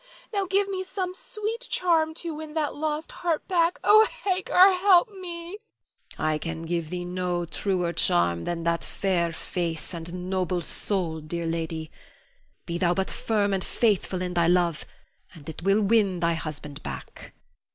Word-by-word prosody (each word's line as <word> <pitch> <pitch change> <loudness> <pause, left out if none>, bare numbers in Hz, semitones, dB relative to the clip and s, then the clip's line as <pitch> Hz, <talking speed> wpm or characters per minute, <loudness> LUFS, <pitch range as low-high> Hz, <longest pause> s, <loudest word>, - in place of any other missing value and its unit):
Now 395 -2 0
give 390 +2 +2
me 380 -1 -2
some 375 -1 -3
sweet 430 +4 -5
charm 320 -3 +2
to 335 -1 -4
win 305 0 -8
that 305 -2 0
lost 310 +1 -3
heart 335 -3 -2
back. 345 -2 +2
Ah, 430 +1 +7 0.2
Hagar, 375 0 +5
help 370 +3 +5
me. 355 0 -7 0.6
Hagar. - - -2
I 155 0 +2
can 165 +1 -5
give 165 -1 -2
thee 175 0 -4
no 180 -1 -1
truer 175 0 -1
charm 85 - +2
than 170 -1 -2
that 170 0 +1
fair 180 -4 0
face 165 0 -3
and 175 +2 -6
noble 185 -2 0
soul, 170 -1 -2
dear 170 +2 -4
lady. 165 -1 -3 0.7
Be 170 0 -3
thou 175 -1 +2
but 190 0 -1
firm 205 -3 0
and 190 -1 0
faithful 195 -4 +1
in 180 0 -3
thy 170 -1 +3
love 175 -2 +2 0.5
and 150 -4 -13
it 160 - -7
will 195 +3 +3
win 200 -3 +3
thy 170 0 +2
husband 150 -3 -6
back. 70 -2 -8
185 Hz, 165 wpm, -26 LUFS, -, 0.7 s, Ah